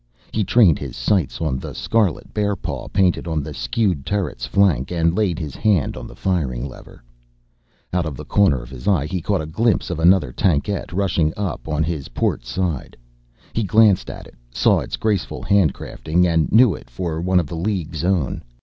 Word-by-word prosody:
He 110 - 0
trained 100 -7 +4
his - - -6
sights 70 - 0
on 70 -5 -1
the - - -7
scarlet 105 -8 0
bearpaw 105 -2 -2
painted 90 -3 +1
on 80 -3 -1
the 75 +1 -6
skewed 75 - -1
turret's 100 -10 -2
flank, 85 -10 +2
and 85 -1 +1
laid 95 -6 +1
his 75 -5 -5
hand 100 -10 +1
on 65 -2 -7
the - - -12
firing 70 -9 -1
lever. 65 - -13 0.9
Out 90 -3 0
of 70 -5 -6
the - - -8
corner 85 -12 +2
of - - -13
his 65 -2 -9
eye, 90 -8 +3
he 90 +3 -3
caught 95 -1 0
a - - -5
glimpse 105 +5 0
of 85 - -3
another 85 -5 +4
tankette 90 +7 0
rushing 85 -4 +1
up 95 -10 -4
on 75 0 0
his 75 -3 -3
port - - -1
side. 80 +2 -3 0.6
He 115 - 0
glanced 105 -1 +4
at - - -8
it, - - -15 0.2
saw - - +3
its - - -4
graceful 105 -6 -1
handcrafting, 90 -2 +1
and 80 -3 +1
knew 115 -1 +6
it 70 - -11
for 80 +5 -3
one 90 +1 +3
of 85 - -1
the 75 - -7
League's 85 -3 -2
own. 90 -6 0
85 Hz, 190 wpm, -21 LUFS, 75-100 Hz, 0.9 s, knew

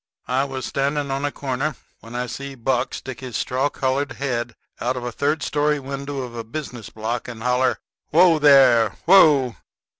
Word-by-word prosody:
I 130 +2 +1
was 135 -2 -5
standing 140 0 -1
on 135 +1 -1
a 145 - -1
corner 140 +2 -3 0.2
when 115 +1 -11
I 125 +1 -1
see 140 +2 -7
Buck 125 +1 -1
stick 130 -1 -7
his 125 -5 -5
straw 130 +3 0
colored 135 0 -1
head 120 -4 -3 0.2
out 125 +1 -1
of 125 - -5
a 120 - -3
third 145 +5 -1
story 150 0 +1
window 140 +1 -5
of 125 -2 -8
a 115 - -4
business 120 -2 -7
block 110 +2 -4
and 115 -2 -8
holler, 125 0 +2 0.3
"Whoa, 170 0 +5
there! 130 -7 +5
Whoa!" 145 -10 +5
135 Hz, 180 wpm, -22 LUFS, 125-140 Hz, 0.3 s, Whoa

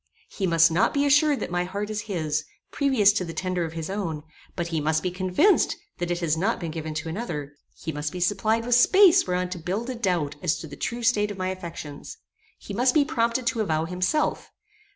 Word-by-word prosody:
He 195 - -2
must 165 -1 +5
not 175 - +2
be 285 0 +2
assured 290 0 +4
that - - -4
my 175 0 0
heart 200 +4 -4
is 210 -1 -2
his, 160 -8 -2 0.3
previous 255 -8 +3
to 200 - -1
the 165 -2 -7
tender 180 0 -1
of 160 - -7
his 165 -1 -4
own; 175 -7 -3 0.3
but 175 -2 -3
he 160 -2 -1
must 155 +1 0
be 180 - -1
convinced 185 - +2 0.2
that 175 - -2
it 175 0 -2
has 160 -2 +1
not 195 +8 0
been 170 -3 -4
given 160 -1 -5
to 160 +1 -3
another; 160 -7 -5 0.2
he 160 - -5
must 150 0 -4
be 180 - -6
supplied 215 +5 +1
with 245 - +1
space 375 - +6
whereon 180 0 -1
to 180 - -5
build 200 +9 -3
a - - -5
doubt 180 -11 -1
as 170 -3 +1
to - - -8
the 145 -2 -9
true 240 0 -4
state 210 -3 +2
of 205 - -6
my 185 0 -2
affections; 170 -6 -7 0.4
he - - -9
must 250 +3 +2
be 295 -2 +5
prompted 235 -4 0
to 230 -1 0
avow 160 -6 0
himself. 185 - -1
185 Hz, 225 wpm, -25 LUFS, 165-230 Hz, 0.4 s, space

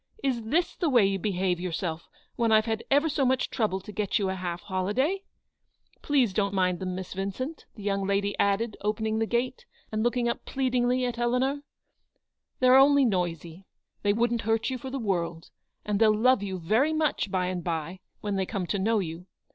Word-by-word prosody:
Is 255 -4 0
this 330 +10 0
the 340 - 0
way 240 -7 +5
you 195 0 0
behave 185 -2 0
yourself 170 -2 -4 0.3
when 230 -2 +1
I've 220 0 +5
had 225 -1 -2
ever 285 +3 +4
so 295 -2 0
much 260 0 +1
trouble 210 -5 0
to 210 - -10
get 210 0 0
you 200 -3 0
a - - -1
half 180 -2 -4
holiday? 210 - 0 0.8
Please, 265 -8 +2
don't 200 0 0
mind 185 -2 +1
them, 185 -1 -3
Miss 185 -1 -6
Vin 195 +1 -2
cent," 260 - -6
the 210 - -10
young 195 -1 -1
lady 200 0 0
added, 200 +2 +1
opening 220 +1 -1
the 225 - 0
gate, 255 - -2 0.2
and 215 0 -1
looking 240 +1 +1
up 235 - -2
pleadingly 255 -1 +1
at 240 -1 -3
Eleanor; 255 +4 +1 0.5
" - - -53
they're 255 0 +6
only 280 0 +6
noisy. 175 -3 -2 0.3
They 205 - +2
wouldn't 235 +2 +1
hurt 225 +3 0
you 255 - -3
for 265 - -6
the 270 - -3
world; 170 -7 -2 0.3
and 210 -1 0
they'll 215 -1 +5
love 255 0 +4
you 190 -2 -3
very 220 - +2
much 310 -9 0
by 185 -1 0
and 180 -1 -3
by, 165 +2 -3 0.2
when 205 -1 -2
they 190 -1 -1
come 195 -3 -3
to 200 +3 -2
know 220 +4 +2
you. 175 -2 -4
215 Hz, 205 wpm, -27 LUFS, 190-250 Hz, 0.8 s, they're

